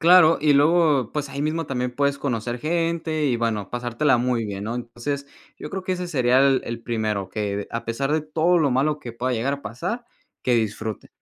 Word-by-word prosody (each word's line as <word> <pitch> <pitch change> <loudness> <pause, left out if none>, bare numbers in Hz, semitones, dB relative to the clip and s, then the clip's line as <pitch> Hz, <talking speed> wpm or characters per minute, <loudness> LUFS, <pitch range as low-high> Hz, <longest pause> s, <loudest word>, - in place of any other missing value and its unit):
Claro, 170 -1 +7
y 150 0 +4
luego 145 -4 +4
pues 150 -2 -2
ahí 140 +1 -4
mismo 160 +1 -1
también 125 -2 -2
puedes 140 +2 0
conocer 120 -3 -2
gente, 165 0 0
y 125 -3 +2
bueno, 115 -4 -1
pasártela 120 +3 +1
muy 120 -1 0
bien, 100 -2 -5
¿no?, 115 +2 -3
entonces 125 +4 -4 0.3
yo 150 - -7
creo 190 - -4
que 185 0 -1
ese 180 0 -3
sería 130 -5 +3
el 135 -1 +4
el 115 0 -5
primero, 110 -5 -1
que 100 0 -3
a 115 0 -3
pesar 135 +5 -1
de 155 - +2
todo 160 +3 +2
lo 145 -5 +2
malo 150 +4 +1
que 120 - -7
pueda 125 +2 -2
llegar 125 +4 0
a 140 - -11
pasar, 180 - -4 0.4
que 125 - +2
disfrute. 110 -1 -2
135 Hz, 210 wpm, -23 LUFS, 115-155 Hz, 0.4 s, Claro